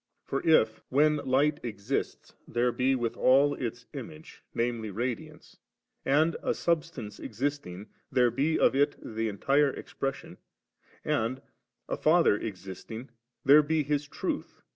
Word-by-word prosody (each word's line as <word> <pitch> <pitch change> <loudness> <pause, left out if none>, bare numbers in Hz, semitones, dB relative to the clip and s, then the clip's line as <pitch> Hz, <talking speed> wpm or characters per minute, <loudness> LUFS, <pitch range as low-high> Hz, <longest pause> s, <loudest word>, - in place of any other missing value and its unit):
For 135 - -2
if, 110 -9 +3
when 150 +3 +4
Light 145 +2 +1
exists, 115 +2 -4
there 120 +1 +1
be 130 +2 +1
withal 130 +4 +3
its 120 -1 -5
Image, 155 +3 -9
viz. 120 +1 +1 0.2
Ra 105 +5 -3
diance, - - -14 0.5
and, 155 +4 +3
a - - 0
Subsistence 165 -11 -2
existing, 110 -6 -4 0.2
tliere 125 -2 +3
be 150 +5 +2
of - - +3
it 145 +1 +2
the 110 0 -3
entire 140 +8 +2
Expression, 135 0 -5 0.7
and, 115 +4 0 0.5
a - - -2
Father 155 -9 +4
ex 95 -4 -6
isting, 110 +6 -8 0.4
there 145 +3 +8
be 155 +1 0
His 145 0 -1
Truth - - -4
(viz. - - -32
135 Hz, 140 wpm, -29 LUFS, 115-145 Hz, 0.7 s, there